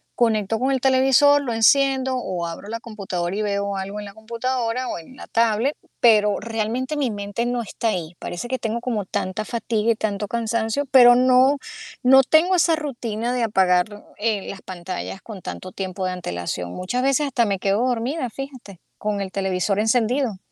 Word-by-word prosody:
conecto 220 -2 +1
con 260 +3 0
el 260 -2 0
televisor, 270 +2 +5
lo 240 -4 -2
enciendo 265 +3 +3
o 180 -8 -3
abro 170 +5 -8
la 230 +1 -4
computadora 195 -5 -4
y 215 - -1
veo 200 -1 -1
algo 195 +2 -5
en 205 - -7
la 200 - -11
computadora 235 +2 -2
o - - -3
en 170 +10 -12
la - - -11
tablet, 230 +5 +1 0.2
pero 210 -3 +4
realmente 230 +6 -2
mi 265 -6 0
mente 205 +3 -3
no 245 0 -1
está 225 +1 -2
ahí. 175 -4 -3
Parece 175 +7 -5
que 260 - -1
tengo 230 -1 -3
como 225 -6 -2
tanta 185 +3 -3
fatiga 230 -1 0
y - - +1
tanto 210 -1 -2
cansancio, 230 +4 -1
pero 245 -2 +8
no 255 +3 +4 0.4
no 265 +1 +7
tengo 325 +7 +4
esa 330 -1 +4
rutina 240 -6 -3
de 250 -1 0
apagar, 190 -1 +1
eh, 210 -2 -1
las 195 - -8
pantallas 185 +1 -6
con 205 -5 -10
tanto 185 - -7
tiempo 190 0 -5
de 185 - -1
antelación. 90 - -4
Muchas 245 +8 -2
veces 275 +2 +2
hasta 245 -3 +1
me 200 -3 -1
quedo 200 +5 +1
dormida, 250 +2 -1
fíjate, 255 -8 -9 0.2
con 210 -1 -2
el 190 -1 -4
televisor 190 0 -1
encendido. 230 +1 +1
225 Hz, 185 wpm, -22 LUFS, 200-255 Hz, 0.4 s, pero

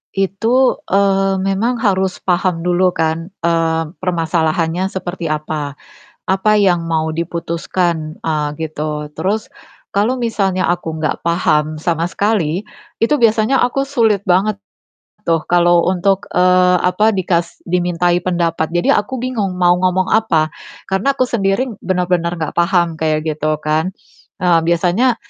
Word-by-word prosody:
itu, 225 +7 +1
eee, 195 0 +2
memang 195 +6 0
harus 190 -2 0
paham 180 -2 0
dulu 180 +1 +2
kan, 160 +1 -1 0.2
eee, 165 -1 +1 0.2
permasalahannya 165 0 0
seperti 180 -3 -5
apa, 150 -2 -3 0.5
apa 195 +3 +2
yang 175 -4 +2
mau 160 -1 0
diputuskan, 170 0 -2
eee, 155 -2 -1
gitu 150 -1 -4
terus, 210 +3 -1 0.4
kalau 235 +6 0
misalnya 195 -5 0
aku 165 -2 -2
nggak 155 +1 -2
paham 155 -2 +1
sama 165 0 0
sekali, 180 -2 0 0.4
itu 235 +6 +3
biasanya 225 +1 +3
aku 275 +3 -1
sulit 225 -7 +2
banget, 195 +3 +2 0.7
tuh 165 -1 +2
kalau 175 -1 +4
untuk, 190 +1 0
eee, 180 0 +4
apa 185 +4 +3
dikas 175 -2 -1
dimintai 175 0 +1
pendapat, 170 -3 -1
jadi 175 +1 +2
aku 260 +5 -6
bingung 225 -7 -2
mau 175 -1 +4
ngomong 185 0 +1
apa, 165 -8 +2 0.3
karena 200 +9 0
aku 255 - +3
sendiri 205 -1 0 0.2
benar-benar 180 -2 0
nggak 160 -2 -3
paham 170 -1 +2
kayak 155 -1 0
gitu 155 0 -1
kan. 155 +3 0 0.5
Ah, 175 -2 +4
biasanya, 180 +9 +2
180 Hz, 130 wpm, -17 LUFS, 165-195 Hz, 0.7 s, kalau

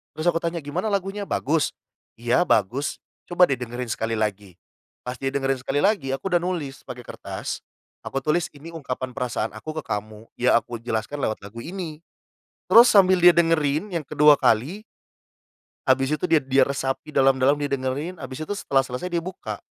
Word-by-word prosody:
terus 155 - -4
aku 165 - +1
tanya, 170 -1 -3
"Gimana 175 +9 -3
lagunya 200 0 -2
bagus? 155 +2 0 0.4
"Iya 120 +10 +1
bagus," 120 +8 0 0.3
"coba 175 -1 +4
deh 135 - +1
dengerin 120 0 -5
sekali 115 +1 -2
lagi," 105 -4 -3 0.5
pas 125 0 -5
dia 135 - -2
dengerin 135 -1 0
sekali 145 +3 -1
lagi 165 -11 +1
aku 190 +8 -5
udah 175 - +4
nulis 170 -7 -4
pakai 125 0 -8
kertas, - - -6 0.5
aku 135 - -3
tulis 170 +3 +1
ini 155 +4 -10
ungkapan 130 -5 -5
perasaan 125 -4 -2
aku 155 +8 -7
ke - - -27
kamu 105 +1 -5
ya 125 0 +4
aku 120 - -7
jelaskan 115 +4 -3
lewat 110 -6 -2
lagu 105 +3 -9
ini, 165 0 -6 0.7
terus 240 +2 +8
sambil 185 -3 +5
dia 175 0 +9
dengerin 165 +2 +1
yang 165 -3 -1
kedua 150 -1 +6
kali. 145 - +1 1.0
Habis 135 +3 +3
itu - - -7
dia 165 -3 +4
dia 135 0 +3
resapi 135 +2 -3
dalam-dalam 135 +1 +3
dia 145 - -1
dengerin 140 +6 -2
habis 130 -1 -8
itu 200 +6 -3
setelah 135 -7 +2
selesai 135 +8 -5
dia 170 - +1
buka, 165 - -7
140 Hz, 175 wpm, -24 LUFS, 125-170 Hz, 1.0 s, dia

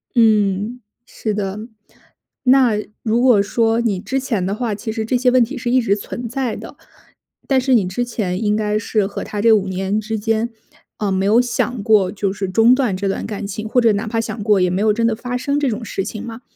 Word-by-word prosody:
嗯， 215 0 +2 0.3
是 215 - -4
的。 200 0 -3 0.8
那 255 -3 +5 0.3
如 225 +1 +1
果 245 -5 +5
说 225 +2 +1
你 205 -6 0
之 265 +7 -2
前 225 -8 -2
的 195 - -1
话， 220 -1 -2
其 220 +2 -5
实 220 0 -3
这 250 +2 +1
些 250 0 +3
问 250 -1 +5
题 270 +5 -5
是 240 -1 -2
一 255 0 +4
直 200 -3 +1
存 235 +4 -6
在 255 -2 -2
的， - - -10 0.7
但 270 -1 +3
是 260 0 +1
你 215 -6 +4
之 240 +7 -2
前 210 -4 -3
应 210 0 +2
该 210 -1 0
是 215 -3 0
和 200 - -5
他 205 - -4
这 225 +1 +5
5 200 -3 +2
年 190 +3 -1
之 220 +1 -3
间， 225 +2 0 0.5
呃， 205 -2 -1
没 190 +1 0
有 220 +4 +5
想 245 -1 -2
过 205 -4 +3
就 200 -2 -2
是 200 -1 -3
中 225 +5 +5
断 250 -8 0
这 200 +1 -2
段 195 - -2
感 205 -2 -5
情， 215 +2 -5
或 245 +2 +2
者 225 -2 +4
哪 205 +3 -2
怕 225 +1 -1
想 225 -2 -5
过 205 -3 +3
也 180 - +3
没 185 +3 -1
有 215 -1 +3
真 230 +1 +1
的 225 - 0
发 245 +2 -5
生 280 +3 -1
这 285 - 0
种 225 0 -4
事 195 - -3
情 215 -1 -6
吗？ 230 0 -8
220 Hz, 250 characters per minute, -19 LUFS, 205-240 Hz, 0.8 s, 那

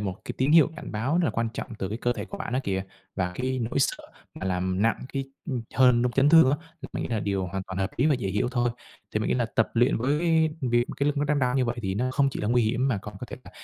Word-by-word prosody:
một 95 -2 -2
cái - - -4
tín 135 +4 +2
hiệu 160 -2 +6
cảnh - - -8
báo 130 +10 0
rất 180 - +2
là 135 - +2
quan 115 +1 -1
trọng 120 - -5
từ 95 - -2
cái 110 +3 -4
cơ 120 0 +1
thể 105 -3 -5
của - - -8
bạn - - -5
đó 130 - +1
kìa. 95 -1 -1 0.3
Và 90 -2 -1
cái 130 +3 -2
nỗi 115 +4 -1
sợ 135 - 0 0.3
mà 95 - -5
làm 95 +1 0
nặng 115 0 +3 0.2
cái, 135 -1 -2 0.3
ừm, 125 -3 -2
hơn 125 -2 +5
trong 125 - +1
chấn 135 +3 +4
thương 160 -4 +7
á, 145 - +2 0.3
thì 135 - -6
mình - - -3
nghĩ - - -4
là 110 -3 -1
điều 95 -2 -1
hoàn 95 +2 -4
toàn 95 0 -5
hợp 95 0 0
lý 135 - +3
và 150 - +4
dễ 115 -6 -3
hiểu 105 +5 0
thôi. 120 -2 +1 0.4
Thì 105 - +1
mình - - -1
nghĩ - - +2
là 120 -2 +1
tập 110 - +3
luyện 120 +3 +3
với 135 +6 +1 0.4
việc 120 -2 +1
mà - - -5
cái 140 - 0
lưng 145 0 0
đang 145 0 +2
đau 125 -2 +1
như 130 - +3
vậy 120 +1 -2
thì 95 -1 -1
nó 125 +4 0
không 140 0 +2
chỉ - - -5
là 105 - -1
nguy 120 +1 +3
hiểm, 120 +5 +1
mà 115 - 0
còn 105 +1 -9
có 125 - -5
thể - - -6
là - - -12
120 Hz, 315 wpm, -26 LUFS, 105-130 Hz, 0.4 s, thương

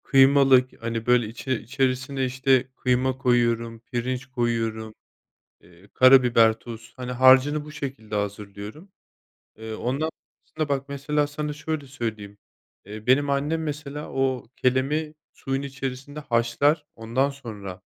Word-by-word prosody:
Kıymalık, 135 -3 +4
hani, 115 -1 -3
böyle, 125 -2 +3
içi 120 +4 -6
içerisine, 130 +2 -1
işte, 130 0 +2
kıyma 130 +1 +1
koyuyorum, 120 -3 +1
pirinç 125 +2 -3
koyuyorum, 115 -3 -2 0.7
eee, 85 +3 -20
karabiber, 125 -3 +6
tuz, 115 0 -10
hani, 125 -1 -5
harcını 130 +4 +5
bu 150 - -10
şekilde 135 -7 -6
hazırlıyorum. 105 - -5 0.7
Eee, 110 0 -7
ondan 135 +8 -1 0.4
sonra 155 -2 -4
bak, 140 0 -2
mesela, 145 +1 0
sana 150 0 -4
şöyle 150 -1 -4
söyleyeyim, 110 -6 -5 0.5
eee, 105 +2 -9
benim 140 +3 +4
annem, 145 +4 0
mesela, 150 -1 -5
o, 130 -2 -1
kelemi 140 +5 0 0.2
suyun 135 0 -3
içerisinde 135 +1 -6
haşlar, 145 +3 +1
ondan 120 +5 0
sonra, 105 -9 -8
130 Hz, 125 wpm, -25 LUFS, 115-140 Hz, 0.7 s, karabiber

